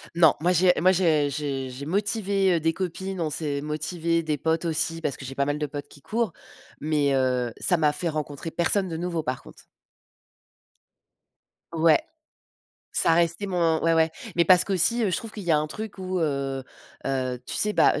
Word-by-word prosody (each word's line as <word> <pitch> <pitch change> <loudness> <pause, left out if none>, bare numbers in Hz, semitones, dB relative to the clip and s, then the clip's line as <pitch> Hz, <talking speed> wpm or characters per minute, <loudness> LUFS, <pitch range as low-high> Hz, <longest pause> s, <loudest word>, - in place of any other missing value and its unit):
Non, 165 -3 +6
moi 175 +2 +3
j'ai 180 +1 +4
moi 185 - +5
je 160 -6 +2
j'ai 135 -2 -3
j'ai 130 +3 -7
motivé, 195 0 +1
heu, - - +1
des 165 +1 +1
copines, 190 +1 -4
on 155 - 0
s'est 145 -2 -2
motivé, 165 +2 -1
des 155 -2 -1
potes 160 +3 0
aussi 165 0 0
parce 150 - -2
que - - -11
j'ai 135 +1 -7
pas 140 - +1
mal 145 +1 -1
de 150 - -2
potes 145 -1 -7
qui 145 - -16
courent, 220 - -2 0.5
mais 150 -2 +1
heu, 125 -3 0
ça 175 - +3
m'a 150 -2 +2
fait 175 -2 -1
rencontrer 150 +1 -4
personne 180 +3 +1
de 160 - -4
nouveau 170 -2 -2
par 130 0 -3
contre. - - -15 2.1
Ouais. 165 - +4 0.9
Ça 165 - +3
restait 170 +4 +1
mon 170 -4 +1
ouais, 165 0 +3
ouais, 160 0 +3 0.3
mais 170 - +4
parce 180 -1 +6
qu'aussi, 200 +5 +2
heu, 210 - +2
je 175 - +1
trouve 225 +2 -5
qu'il 210 -3 -8
y 175 - -1
a 155 - +5
un 150 - 0
truc 215 +7 -7
où, 185 -1 -3
heu 140 -3 -1 0.4
heu, 130 -2 -1
tu - - -4
sais, 210 0 +1
bah, - - +5
heu, - - -2
165 Hz, 205 wpm, -25 LUFS, 145-180 Hz, 2.1 s, Non